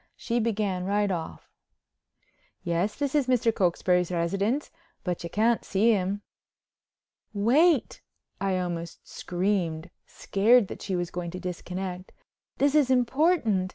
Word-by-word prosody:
She 235 0 -2
began 210 -5 -1
right 205 +1 +1
off: 165 -3 -5 1.2
"Yes, 175 +5 -1
this 285 -2 -2
is 290 -4 +2
Mr. 235 -3 +2
Cokesbury's 180 -2 +1
residence, 195 - -1 0.3
but 180 -3 -3
you 170 - -5
can't 225 +5 +1
see 210 +4 +2
him." 200 0 -1 1.1
"Wait," 270 - +3 0.4
I 195 -1 0
almost 170 -2 -5
screamed, 175 -3 -2 0.2
scared 215 +2 +3
that - - -8
she 190 - -3
was 175 -1 -2
going 175 -1 -4
to 180 +2 -7
disconnect, 180 +1 -6 0.4
"this 285 0 +2
is 295 -4 +4
important. 250 - +2
195 Hz, 125 wpm, -27 LUFS, 180-235 Hz, 1.2 s, is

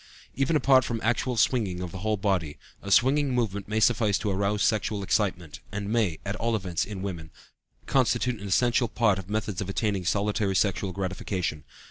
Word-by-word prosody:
Even 135 +4 +1
apart 135 -3 +5
from 115 -1 -3
actual 120 +2 0
swinging 105 -6 +1
of 90 -2 -5
the 95 - -7
whole 110 +2 0
body, 95 -7 -1 0.2
a 100 - -7
swinging 135 +5 +3
movement 100 -5 -1
may 110 +1 0
suffice 110 -3 +3
to 105 -4 -2
arouse 100 +2 0
sexual 105 -1 0
excitement, 90 -5 -1
and 105 +1 -3
may, 105 -9 +1
at 100 +1 -2
all 115 0 0
events, 90 -5 -2
in 100 -2 -6
women, 85 -5 -5 0.6
constitute 125 -3 +1
an 100 - -6
essential 120 +4 +2
part 105 -3 +1
of 95 0 -10
methods 105 -3 -2
of 100 - -4
attaining 100 -1 -1
solitary 100 +1 0
sexual 95 0 +1
gratification. 90 -4 -3
105 Hz, 180 wpm, -27 LUFS, 95-115 Hz, 0.6 s, apart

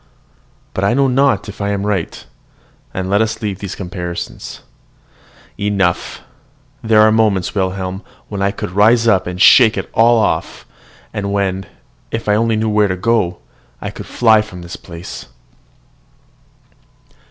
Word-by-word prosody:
But 95 - -2
I 100 +4 +2
know 135 0 +3
not 130 -4 +2
if 105 0 -8
I 100 - -1
am 100 0 -2
right, 100 -5 -3 0.7
and 95 0 -4
let 100 +3 +2
us 110 0 -1
leave 100 -4 -4
these 100 -1 -6
comparisons. 90 -2 -6 1.0
Enough! 100 -4 -1 0.6
There 110 -1 +4
are 110 0 +6
moments, 105 -4 +1
Wilhelm, 95 -1 -2 0.3
when 100 -2 -5
I 100 - +2
could 100 - -5
rise 115 +4 +4
up 95 -5 +3
and 90 0 -5
shake 110 +1 +7
it - - -5
all 115 +1 +5
off, 110 - -1 0.5
and 100 -1 -3
when, 95 -2 -1 0.4
if 115 -1 -4
I 105 - +3
only 115 +1 +2
knew 110 +1 0
where 105 -1 +3
to 95 -1 -2
go, 100 -3 +1 0.4
I - - -5
could - - -9
fly 110 -3 +4
from 90 -5 -9
this 85 - -8
place. 85 0 -9
100 Hz, 155 wpm, -17 LUFS, 95-110 Hz, 1.0 s, shake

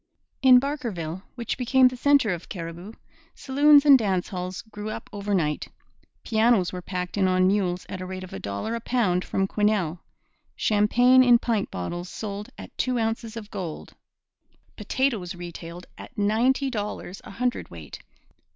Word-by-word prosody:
In 255 -2 +8
Barkerville, 220 - -4
which 235 0 -4
became 255 +1 +5
the 250 - -2
centre 275 -3 +3
of 170 - -8
Cariboo, 170 +3 -7 0.4
saloons 290 +2 +5
and 280 -3 +8
dance 190 -5 -1
halls 185 +1 -5
grew 215 -1 -7
up - - -6
overnight. 195 -7 -1 0.6
Pianos 220 -5 +2
were 180 - -5
packed 180 +1 -5
in 190 - +3
on 185 0 +3
mules 185 -2 0
at 185 - -6
a - - -4
rate 185 0 -6
of 185 - -10
a 95 - -5
dollar 100 - -4
a 230 - -2
pound 215 -7 0
from 195 - -1
Quesnel. 200 -6 0 0.6
Champagne 245 +5 +4
in 245 -2 +6
pint 225 -4 -1
bottles 175 - -5
sold 205 0 -6
at - - -11
two 255 -1 0
ounces 225 0 -2
of 210 -2 -9
gold. 170 -5 -6 0.8
Potatoes 225 -10 -1
retailed 175 0 -8
at - - -12
ninety 240 +7 +2
dollars 205 -4 -5
a - - -11
hundredweight. 195 - -4
205 Hz, 155 wpm, -25 LUFS, 180-240 Hz, 0.8 s, In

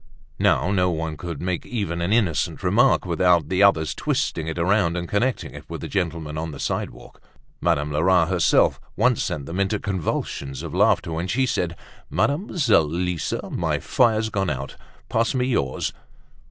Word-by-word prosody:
Now 95 - +2
no 90 -2 +2
one 80 -2 -3
could 85 0 -6
make 90 -1 -2
even 100 -8 -3
an 85 +3 -1
innocent 105 -9 +1
remark - - +3
without 85 -4 +2
the 95 +1 +1
others 80 -6 +4
twisting 80 -1 -1
it 80 - -4
around 90 0 +2
and 85 0 -3
connecting 120 +7 -1
it - - -11
with - - -6
the - - -5
gentleman 80 -5 -2
on 80 +1 -3
the 70 -3 -8
sidewalk. - - -4 0.4
Madame 75 +1 +1
Lerat 85 +3 +3
herself 90 -3 +3 0.2
once 125 +2 +2
sent 70 -3 -3
them 85 +6 -5
into 100 +2 +1
convulsions 75 -8 -3
of - - -6
laughter 85 - +2
when 80 +3 -2
she 130 +8 +1
said, 90 -8 -1 0.3
"Mademoiselle 120 - +2
Lisa, 90 0 -2
my - - 0
fire's 110 -3 +2
gone 95 -3 0
out. 70 -1 -4 0.3
Pass 115 +4 0
me 125 -1 +1
yours." 70 - -1
90 Hz, 165 wpm, -23 LUFS, 80-100 Hz, 0.4 s, others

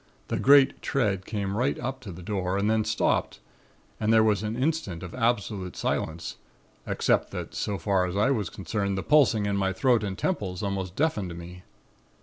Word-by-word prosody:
The - - -1
great 140 0 +5
tread 100 -8 0
came 100 -2 -2
right 125 +5 +1
up 130 +1 -4
to 105 -6 -8
the 90 +1 -10
door 95 -1 -1
and 100 +1 +1
then 110 0 +2
stopped - - 0 0.6
and 110 0 +1
there 110 -1 +6
was 105 -2 +2
an 110 +1 -3
instant 130 - -1
of 90 - -7
absolute 105 -6 -1
silence, 80 +1 -2 0.5
except - - +1
that - - -5
so 100 -2 -2
far 95 -3 +1
as 90 +2 -4
I 105 +6 +3
was 105 -10 -1
concerned, 100 0 -2
the 95 - -2
pulsing 135 -9 +4
in 100 -1 0
my 95 -1 +1
throat 125 -4 +2
and 95 -2 -3
temples 100 - -2
almost 95 -2 -3
deafened 105 - -1
me. 90 +1 -9
105 Hz, 185 wpm, -27 LUFS, 95-120 Hz, 0.6 s, there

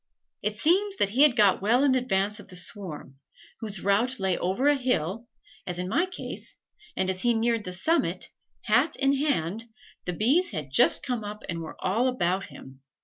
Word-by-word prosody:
It 210 0 -2
seems 385 - +2
that 200 - +1
he 245 +7 +1
had 295 -5 +6
got 205 -5 +4
well 235 +7 +3
in 280 -2 +4
advance 210 -4 0
of - - -12
the 185 - -11
swarm, 175 - -6 0.4
whose 210 -5 -5
route 225 +6 +1
lay 190 -2 +1
over 190 +12 0
a 290 - +6
hill, 235 - -1 0.4
as 180 -1 -4
in 180 0 -3
my 330 - +1
case, 370 - -7 0.4
and 190 - +1
as 190 0 -1
he 240 -1 +2
neared 230 -1 0
the 180 - -5
summit, 320 - 0 0.3
hat - - +2
in 275 0 +2
hand, 230 - -1 0.4
the 180 - -2
bees 270 - +2
had 150 -8 -5
just 135 - +4
come 245 -5 -3
up 210 +1 -7
and 170 -1 -3
were 160 - -8
all 225 +7 +1
about 195 -6 0
him. 135 0 -13
210 Hz, 195 wpm, -26 LUFS, 185-255 Hz, 0.4 s, had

